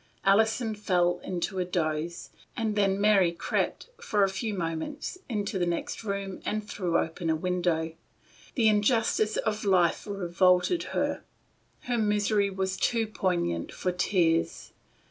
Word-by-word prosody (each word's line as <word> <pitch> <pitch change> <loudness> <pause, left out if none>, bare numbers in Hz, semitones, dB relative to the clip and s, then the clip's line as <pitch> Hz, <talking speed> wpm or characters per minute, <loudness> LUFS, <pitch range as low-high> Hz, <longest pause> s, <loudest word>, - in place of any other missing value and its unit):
Alison 220 +3 +3
fell 180 -4 +1
into 185 +1 -3
a - - +2
doze, 170 -1 -2 0.3
and 220 -3 -1
then 195 -1 +2
Mary 200 -4 +4
crept, 170 - -2
for 210 - +1
a 195 - +3
few 195 +4 -3
moments, 180 - -4
into 205 -4 -2
the 175 - +2
next 170 +6 -3
room, 200 -2 -4
and 215 0 -2
threw 175 -5 0
open 165 +1 -2
a 160 - +3
window. 170 -2 -1 0.6
The 230 -4 +3
injustice 215 0 +2
of 215 -1 -1
life 185 -3 +2
revolted 185 - +2 0.2
her. - - 0 0.6
Her 245 -1 -1
misery 210 -1 +2
was 190 0 -2
too 230 -2 +1
poignant 175 - -1
for 180 - -2
tears. 175 -2 +1
195 Hz, 140 wpm, -28 LUFS, 175-215 Hz, 0.6 s, Mary